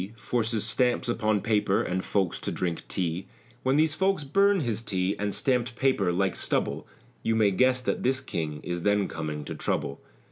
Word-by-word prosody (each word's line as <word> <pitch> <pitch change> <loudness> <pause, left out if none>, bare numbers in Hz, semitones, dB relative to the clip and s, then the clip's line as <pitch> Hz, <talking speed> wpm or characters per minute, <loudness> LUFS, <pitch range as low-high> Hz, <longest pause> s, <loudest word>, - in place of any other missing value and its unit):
Forces 115 -2 0
stamps 125 +2 +1
upon 110 -3 +1
paper 105 -2 +2
and 95 +1 -2
folks 95 -4 0
to - - -3
drink 85 -3 -2
tea; 90 0 -2 0.3
When 130 +1 +2
these 155 0 +3
folks 190 -1 +1
burn 195 +6 +3
his 115 -5 -1
tea 95 -3 -1
and 105 0 -1
stampt 125 +1 0
paper, 120 -8 +2
like 95 +1 0
stubble, - - -1 0.3
You 115 - +1
may 105 -2 +4
guess 130 +5 +3
that - - -1
this 130 +1 +1
King 80 - -4
is 85 0 -3
then 105 +1 +2
coming 75 -2 -5
to - - -5
trouble. 70 -2 -2
110 Hz, 180 wpm, -27 LUFS, 95-130 Hz, 0.3 s, may